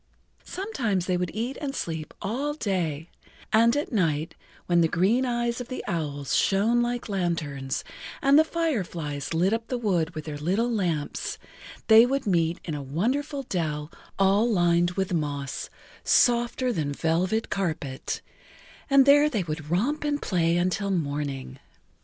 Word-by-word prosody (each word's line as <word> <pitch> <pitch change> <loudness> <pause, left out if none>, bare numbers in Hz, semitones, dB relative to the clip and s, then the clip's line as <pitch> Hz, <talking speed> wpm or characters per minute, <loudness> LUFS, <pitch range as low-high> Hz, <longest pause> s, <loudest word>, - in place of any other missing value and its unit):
Sometimes 245 - -2
they 185 - 0
would 180 -1 -1
eat 235 +5 -3
and 280 -2 -3
sleep 160 -7 -4
all 270 +9 -2
day, 170 - -2 0.5
and 230 +4 +5
at 290 - -2
night, 165 - 0 0.3
when 175 -1 +3
the 165 - +4
green 205 +11 +2
eyes 240 0 -1
of 245 - -7
the 255 - -5
owls 145 -5 -2
shone 220 +5 +3
like 240 0 -2
lanterns 160 -9 -2 0.4
and 275 +2 +5
the - - +7
fireflies 175 - -2
lit 175 +5 +2
up 225 0 -2
the 250 - -2
wood 180 -7 0
with 155 - -5
their 150 -2 -5
little 195 +10 0
lamps, 175 -9 -2 0.5
they 225 +2 +8
would 275 +1 -1
meet 170 -3 +1
in 160 - -3
a 145 - -4
wonderful 260 - -1
dell 155 - -3 0.3
all 195 +4 +3
lined 175 -3 +3
with 190 -1 -1
moss 145 -4 -3 0.3
softer 240 +1 +3
than 150 -6 -2
velvet 180 +8 0
carpet, 155 -8 -3 0.7
and 275 -1 +6
there 290 +2 +6
they 215 -10 -1
would 155 -2 -5
romp 245 - 0
and 295 -1 0
play 170 - +1
until 185 +3 0
morning. 140 -6 -3
185 Hz, 150 wpm, -26 LUFS, 160-240 Hz, 0.7 s, they